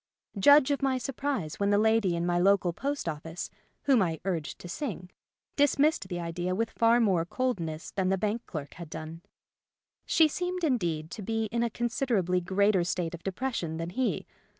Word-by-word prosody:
Judge 285 Hz, +5 st, +7 dB
of 280 Hz, -, 0 dB
my 270 Hz, -1 st, +2 dB
surprise 260 Hz, -, -3 dB
when 200 Hz, 0 st, +2 dB
the 205 Hz, -, +4 dB
lady 220 Hz, -4 st, +3 dB
in 170 Hz, 0 st, -1 dB
my 175 Hz, 0 st, +1 dB
local 190 Hz, -1 st, +3 dB
post 280 Hz, +3 st, -3 dB
office 165 Hz, +2 st, -5 dB, 0.3 s
(whom 265 Hz, -6 st, +4 dB
I 165 Hz, -4 st, 0 dB
urged 170 Hz, -6 st, -2 dB
to -, -, -10 dB
sing) 185 Hz, -, -5 dB, 0.4 s
dismissed 290 Hz, -4 st, +3 dB
the 175 Hz, -2 st, -4 dB
idea 175 Hz, +2 st, -2 dB
with 225 Hz, +3 st, -1 dB
far 230 Hz, +1 st, +4 dB
more 190 Hz, -8 st, +3 dB
coldness 170 Hz, -7 st, -3 dB
than 190 Hz, -2 st, 0 dB
the 190 Hz, -, +2 dB
bank 215 Hz, +4 st, -2 dB
clerk 145 Hz, -5 st, -6 dB
had 170 Hz, -2 st, -9 dB
done. 160 Hz, +1 st, -7 dB, 0.9 s
She 320 Hz, -, +5 dB
seemed, 360 Hz, +3 st, -3 dB
indeed, 170 Hz, -, 0 dB
to 220 Hz, -, -6 dB
be 225 Hz, +2 st, -1 dB
in 235 Hz, 0 st, 0 dB
a 235 Hz, -, +1 dB
consider 240 Hz, +1 st, -1 dB
ably 180 Hz, -1 st, +1 dB
greater 190 Hz, +1 st, +2 dB
state 175 Hz, -1 st, -2 dB
of 175 Hz, -, -7 dB
depression 190 Hz, -5 st, -3 dB
than 165 Hz, +1 st, -4 dB
he. 255 Hz, +6 st, -1 dB
195 Hz, 185 wpm, -29 LUFS, 170-245 Hz, 0.9 s, Judge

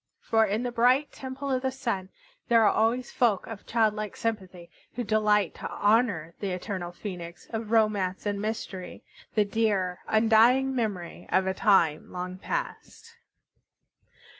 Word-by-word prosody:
For 225 Hz, -1 st, +2 dB
in 210 Hz, +4 st, -1 dB
the 245 Hz, -, -2 dB
bright 250 Hz, +5 st, +3 dB
Temple 265 Hz, +1 st, -6 dB
of 255 Hz, -1 st, +1 dB
the 265 Hz, -, 0 dB
Sun 230 Hz, -8 st, -3 dB, 0.4 s
there 230 Hz, -1 st, +5 dB
are 210 Hz, -, +4 dB
always 235 Hz, +3 st, +1 dB
folk 225 Hz, -6 st, +1 dB
of 225 Hz, -3 st, -9 dB
childlike 215 Hz, -2 st, 0 dB
sympathy 190 Hz, -6 st, -4 dB, 0.2 s
who 245 Hz, -, -2 dB
delight 210 Hz, -3 st, +2 dB
to -, -, -7 dB
honor 205 Hz, -7 st, +1 dB
the 200 Hz, -, -2 dB
eternal 180 Hz, -1 st, -4 dB
Phoenix 175 Hz, -2 st, -8 dB
of 225 Hz, -1 st, -4 dB
romance 215 Hz, -5 st, +1 dB
and 205 Hz, -1 st, -1 dB
mystery, 205 Hz, -4 st, -5 dB, 0.3 s
the 210 Hz, -1 st, +4 dB
dear, 200 Hz, -4 st, 0 dB
undying 230 Hz, +5 st, +4 dB
memory 205 Hz, -8 st, -3 dB
of 190 Hz, 0 st, +2 dB
a 190 Hz, -, 0 dB
time 190 Hz, -8 st, +2 dB
long 180 Hz, +1 st, -5 dB
past. 460 Hz, -, -5 dB
215 Hz, 145 wpm, -27 LUFS, 190-230 Hz, 0.4 s, there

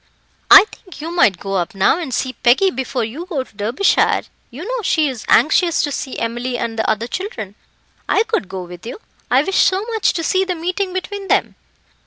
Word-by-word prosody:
"I 400 Hz, 0 st, +10 dB
think 370 Hz, -5 st, -14 dB
you 320 Hz, +3 st, -5 dB
might 200 Hz, -, +4 dB
go 195 Hz, +2 st, -6 dB
up 185 Hz, +4 st, -3 dB
now 195 Hz, -, +3 dB
and 325 Hz, -7 st, -5 dB
see 255 Hz, +1 st, -2 dB
Peggy 270 Hz, +12 st, +3 dB
before 260 Hz, -4 st, -3 dB
you 280 Hz, +11 st, -6 dB
go 295 Hz, -8 st, -2 dB
to 240 Hz, -, -24 dB
Derbyshire; 230 Hz, -, +1 dB, 0.3 s
you 280 Hz, +8 st, -9 dB
know -, -, -3 dB
she 315 Hz, -6 st, +2 dB
is 255 Hz, -5 st, -5 dB
anxious 335 Hz, +1 st, +3 dB
to 290 Hz, -, -1 dB
see 270 Hz, -1 st, -5 dB
Emily 240 Hz, +2 st, -3 dB
and 225 Hz, -1 st, -4 dB
the -, -, 0 dB
other 220 Hz, +1 st, 0 dB
children. 240 Hz, -, -5 dB, 0.6 s
I 420 Hz, -, +3 dB
could 440 Hz, -, -2 dB
go 185 Hz, -1 st, -5 dB
with 175 Hz, 0 st, -11 dB
you. 240 Hz, -, -7 dB, 0.3 s
I -, -, +4 dB
wish 385 Hz, -, 0 dB
so 380 Hz, +3 st, +3 dB
much 445 Hz, -, +1 dB
to 330 Hz, -, -3 dB
see 375 Hz, +3 st, +2 dB
the 370 Hz, -1 st, -2 dB
meeting 365 Hz, +3 st, -2 dB
between 390 Hz, +2 st, -5 dB
them." -, -, +1 dB
290 Hz, 210 wpm, -18 LUFS, 230-375 Hz, 0.6 s, I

